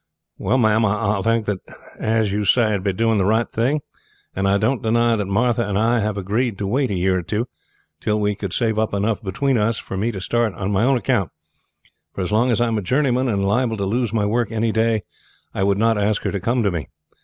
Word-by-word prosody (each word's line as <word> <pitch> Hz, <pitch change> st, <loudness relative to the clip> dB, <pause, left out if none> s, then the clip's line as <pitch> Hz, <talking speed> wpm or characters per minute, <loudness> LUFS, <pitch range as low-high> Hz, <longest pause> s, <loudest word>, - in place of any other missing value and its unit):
"Well, 130 Hz, -, +1 dB
ma'am, 110 Hz, -2 st, +3 dB
I 105 Hz, -1 st, +1 dB
think 115 Hz, +1 st, +1 dB
that, 100 Hz, -2 st, -2 dB, 0.4 s
as 110 Hz, -2 st, +1 dB
you 105 Hz, +1 st, -1 dB
say, 110 Hz, +3 st, +3 dB
it 105 Hz, -, +1 dB
would 95 Hz, -, -8 dB
be 100 Hz, -, +1 dB
doing 110 Hz, +2 st, +1 dB
the -, -, +2 dB
right 110 Hz, +4 st, +2 dB
thing; 135 Hz, +7 st, 0 dB, 0.5 s
and 95 Hz, +1 st, 0 dB
I 100 Hz, +1 st, +3 dB
don't 115 Hz, +5 st, 0 dB
deny 115 Hz, +1 st, +2 dB
that 105 Hz, -3 st, -2 dB
Martha 115 Hz, +4 st, +1 dB
and 100 Hz, -3 st, -2 dB
I 115 Hz, +3 st, +2 dB
have 105 Hz, -1 st, -1 dB
agreed 105 Hz, +3 st, -1 dB
to 100 Hz, -, -3 dB
wait 130 Hz, +6 st, 0 dB
a 100 Hz, -, -1 dB
year 95 Hz, +1 st, +1 dB
or -, -, -3 dB
two, 105 Hz, +7 st, -2 dB, 0.5 s
till 105 Hz, +4 st, 0 dB
we 105 Hz, 0 st, +1 dB
could 100 Hz, -2 st, -5 dB
save 110 Hz, 0 st, 0 dB
up 110 Hz, -2 st, 0 dB
enough 105 Hz, +2 st, 0 dB
between 115 Hz, +6 st, 0 dB
us 110 Hz, +2 st, +1 dB
for 95 Hz, -, -6 dB
me 110 Hz, +5 st, 0 dB
to 100 Hz, -, -6 dB
start 115 Hz, +2 st, 0 dB
on 100 Hz, 0 st, -3 dB
my 100 Hz, +3 st, +2 dB
own 135 Hz, 0 st, +3 dB
account; 120 Hz, -7 st, 0 dB, 0.9 s
for -, -, -3 dB
as 90 Hz, -, -2 dB
long 115 Hz, +4 st, +3 dB
as 120 Hz, -, +2 dB
I 120 Hz, -, +3 dB
am 115 Hz, -2 st, 0 dB
a -, -, -4 dB
journeyman, 130 Hz, +4 st, +1 dB
and 100 Hz, -4 st, 0 dB
liable 115 Hz, +2 st, +1 dB
to 100 Hz, -, -1 dB
lose 115 Hz, +2 st, -1 dB
my 110 Hz, -2 st, 0 dB
work 115 Hz, +3 st, 0 dB
any 115 Hz, 0 st, 0 dB
day, 110 Hz, -1 st, +1 dB, 0.5 s
I -, -, -3 dB
would 100 Hz, 0 st, +2 dB
not 115 Hz, 0 st, +2 dB
ask 105 Hz, 0 st, 0 dB
her -, -, -1 dB
to 100 Hz, -, -2 dB
come 120 Hz, +5 st, 0 dB
to 100 Hz, -, +1 dB
me. 80 Hz, -7 st, -4 dB
110 Hz, 250 wpm, -21 LUFS, 100-115 Hz, 0.9 s, ma'am